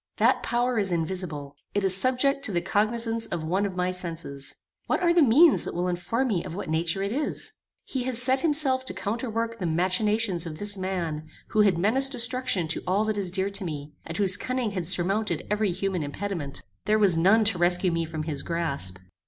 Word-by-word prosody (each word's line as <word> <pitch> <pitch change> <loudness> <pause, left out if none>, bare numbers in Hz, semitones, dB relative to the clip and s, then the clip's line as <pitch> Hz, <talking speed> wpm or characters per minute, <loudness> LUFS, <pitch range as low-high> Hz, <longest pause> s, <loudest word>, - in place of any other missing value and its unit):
That - - +2
power 240 0 0
is 195 -2 +1
invisible. 160 -4 -3 0.2
It 205 - 0
is 190 -1 +9
subject 260 +5 +2
to - - 0
the 175 - 0
cognizance 225 +5 0
of 170 -2 -4
one 190 +5 0
of 190 - -8
my 180 0 -1
senses. 165 -6 -6 0.3
What 385 - -1
are 340 -1 +3
the 345 - +4
means 285 +5 +5
that - - -6
will 175 +1 -1
inform 230 +9 -2
me 185 -6 -1
of 180 -2 -7
what 185 -5 -5
nature 165 +4 -1
it 200 - -2
is? 290 +5 -2 0.3
He 260 - -4
has 255 -2 +5
set 260 +1 +5
himself 285 -4 +3
to - - -4
counterwork 230 +1 -3
the 180 - -2
machinations 185 +2 0
of 155 -1 -7
this 205 +2 -4
man, 175 -5 -4 0.2
who 215 - +2
had 195 -4 +3
menaced 255 +9 +3
destruction 240 - +1
to - - -1
all 200 +4 +1
that 215 -1 -2
is 190 -2 0
dear 190 +2 -2
to 195 0 0
me, 150 -3 -6
and 165 - -7
whose 195 -1 +6
cunning 255 -3 -3
had 180 -4 -2
surmounted 185 -1 +1
every 210 -2 +1
human 185 0 -2
impediment. 150 -1 -5 0.2
There 215 +2 +2
was 200 -5 +4
none 195 +7 +4
to 205 -4 +3
rescue 175 +1 +2
me 165 0 -1
from 160 -1 -5
his 150 -3 -4
grasp. 140 - -3
195 Hz, 210 wpm, -25 LUFS, 170-230 Hz, 0.3 s, is